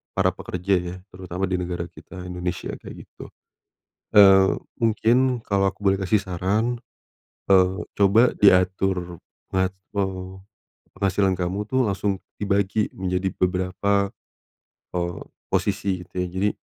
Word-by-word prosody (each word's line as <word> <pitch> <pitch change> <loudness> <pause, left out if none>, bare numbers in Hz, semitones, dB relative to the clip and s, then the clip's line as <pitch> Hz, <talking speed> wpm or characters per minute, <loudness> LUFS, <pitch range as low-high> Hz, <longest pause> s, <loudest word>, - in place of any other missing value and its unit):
para - - +3
pekerja 90 +2 -1
ya, 90 0 -6 0.2
terutama 90 0 -3
di 90 - -1
negara 90 -1 -3
kita, 90 0 -11
Indonesia, 90 0 -4
kayak - - -11
gitu. - - -12 0.8
Eee, 95 -2 +7 0.2
mungkin 120 +2 +2
kalo 100 -1 +1
aku 100 - -5
boleh 95 0 +3
kasih 100 +2 +1
saran, 105 +6 -1 0.7
eee, 95 0 +5 0.2
coba 105 +5 +5
diatur 90 -2 +3 0.3
mate 95 0 0 1.2
penghasilan 95 0 +1
kamu 95 +3 -2
tuh 130 +4 +1
langsung 95 0 -1 0.2
dibagi 100 +1 0
menjadi 95 0 -2
beberapa, 95 +2 +1 0.8
eee, 85 -1 -2 0.3
posisi 95 -2 0
gitu - - -32
ya, - - -3
jadi, 95 +4 0
95 Hz, 120 wpm, -24 LUFS, 90-100 Hz, 1.2 s, Eee